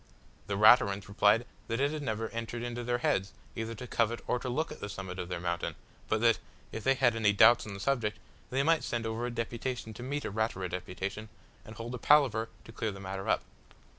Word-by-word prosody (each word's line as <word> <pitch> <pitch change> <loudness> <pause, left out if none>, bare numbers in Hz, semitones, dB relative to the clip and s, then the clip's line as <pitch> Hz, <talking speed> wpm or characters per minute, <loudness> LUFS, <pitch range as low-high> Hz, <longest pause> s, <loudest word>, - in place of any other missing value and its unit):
The 100 - -1
Raturans 100 -2 +6
replied 105 +3 +3 0.2
that 115 +1 -1
it 140 +1 +2
had 155 -1 -4
never 110 -4 -2
entered 115 +1 -4
into 120 0 -4
their 120 0 0
heads 100 -4 0 0.2
either 115 +1 -4
to 125 - -7
covet 115 -1 0
or 125 - 0
to 125 - -4
look 155 +6 -1
at - - -8
the 105 - -5
summit 95 -2 -6
of 90 - -4
their 90 - -3
mountain, 85 0 -2 0.3
but 110 - +1
that, 115 -1 +4 0.3
if 110 - -5
they 135 0 +4
had 125 -3 +3
any 105 -2 +3
doubts 115 +3 +6
on 100 - -6
the - - -7
subject, 110 -2 0 0.3
they 135 +2 +1
might 165 +2 +3
send 115 -1 -2
over 115 +2 -2
a - - -2
deputation 115 0 -4
to 110 - -10
meet 145 +3 -3
a - - -3
Ratura 100 -3 -1
deputation, 95 +4 -5 0.3
and 110 - -11
hold 115 +2 -6
a 125 - -4
palaver 120 -7 +4
to - - -12
clear 115 -1 -2
the 100 - -9
matter 95 0 -5
up. - - +2
115 Hz, 225 wpm, -31 LUFS, 105-120 Hz, 0.3 s, Raturans